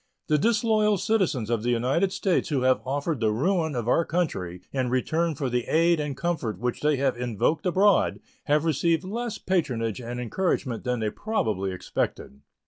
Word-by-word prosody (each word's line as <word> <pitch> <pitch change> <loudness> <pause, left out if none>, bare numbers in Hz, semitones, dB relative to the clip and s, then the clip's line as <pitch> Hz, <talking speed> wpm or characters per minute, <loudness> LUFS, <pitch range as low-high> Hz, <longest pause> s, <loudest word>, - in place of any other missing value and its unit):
The 150 -1 +3
disloyal 215 0 +2
citizens 165 - 0
of 115 -2 +1
the 120 - -1
United 130 +11 +1
States 190 -2 0
who 140 -4 0
have 130 0 +3
offered 145 +2 -1
the 110 -2 +2
ruin 160 - 0
of 120 -2 -3
our 165 - +3
country 95 - -2
in 130 -2 0
return 160 +6 0
for 135 -1 -2
the 125 -1 -1
aid 165 +1 +3
and 145 -3 -3
comfort 150 - -2
which 120 +4 -3
they 150 0 +3
have 135 -1 +1
invoked 125 - -1
abroad 195 +2 +3 0.3
have 150 +1 +2
received 165 +1 +1
less 225 +4 -4
patronage 125 - -1
and 120 +1 -5
encouragement 125 - -1
than 125 -2 -1
they 105 -1 0
probably 110 - -1
expected. 70 -6 -4
145 Hz, 175 wpm, -26 LUFS, 120-175 Hz, 0.3 s, The